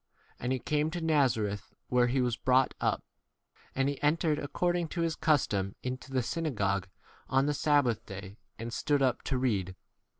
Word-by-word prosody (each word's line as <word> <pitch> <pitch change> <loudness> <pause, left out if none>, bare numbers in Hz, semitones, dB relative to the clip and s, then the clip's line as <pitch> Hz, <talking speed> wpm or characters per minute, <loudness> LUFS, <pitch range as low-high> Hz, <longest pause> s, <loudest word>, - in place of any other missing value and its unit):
And 125 - -2
he 130 - +2
came 150 +4 0
to 175 +2 -4
Nazareth, 120 -11 +1
where 125 -1 +4
he 130 +2 +1
was 120 -2 +1
brought 130 +1 +3
up; - - +1 0.7
and 135 0 +2
he 140 -1 -3
entered, 150 0 +2
ac 145 - -4
cording 175 +2 0
to 170 +2 -3
his 165 -2 0
custom, 100 -11 +1
into 130 +1 -5
the 130 -2 +1
synagogue 105 - -1 0.4
on 135 +1 +3
the 150 - +1
sabbath 145 -6 +2
day, 100 - -6
W 95 +2 -10 0.2
and 115 +1 -6
stood 145 -2 +1
up 130 -2 +2
to 135 - -1
read. 100 -8 0
130 Hz, 180 wpm, -30 LUFS, 115-150 Hz, 0.7 s, where